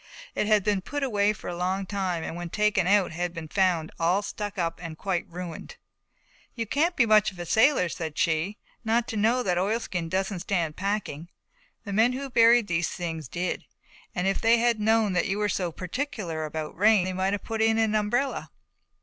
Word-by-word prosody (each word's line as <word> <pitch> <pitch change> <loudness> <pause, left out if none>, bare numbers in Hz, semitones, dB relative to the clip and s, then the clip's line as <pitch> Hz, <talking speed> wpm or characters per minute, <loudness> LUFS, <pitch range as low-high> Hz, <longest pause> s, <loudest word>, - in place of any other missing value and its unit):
It - - -1
had 215 -2 +4
been 205 -1 +1
put 290 +8 -4
away 210 -5 +2
for 215 - -8
a 175 - -3
long 185 +2 -1
time 185 -4 -2
and 165 - -5
when 175 0 -5
taken 210 -1 +1
out 200 -2 +3
had 175 +1 -3
been 165 -1 -6
found 175 -3 +1
all 175 +5 +2
stuck 205 -1 -5
up 165 -2 -2
and 165 -2 -7
quite 185 -2 -2
ruined. 175 - -7 0.8
"You 230 -2 -2
can't 320 - +1
be 250 - +4
much 215 -2 +4
of 185 - -16
a 175 - -5
sailor," 220 - +4
said 160 -2 -5
she, 170 +6 0 0.3
"not 230 +1 +1
to - - -4
know 230 +4 +2
that 180 -4 +1
oilskin 190 -4 -1
doesn't 190 +1 -1
stand 170 -4 -1
packing. 190 -5 -3 0.5
The 200 - -5
men 225 +5 +4
who 270 +1 -5
buried 235 0 +6
these 170 -3 0
things 165 -5 -5
did. 180 +7 -3 0.5
If 190 +2 0
they 230 +1 +5
had 235 -1 +2
known 220 -1 +2
that 180 - +1
you 200 0 -1
were 210 0 +1
so 180 -3 -1
particular 180 - -4
about 155 0 -5
rain 205 0 +4
they 185 - -2
might 190 +2 0
have 205 - -3
put 225 -1 -3
in 225 0 +3
an 220 -1 +2
umbrella." 240 +6 0
195 Hz, 200 wpm, -26 LUFS, 175-220 Hz, 0.8 s, buried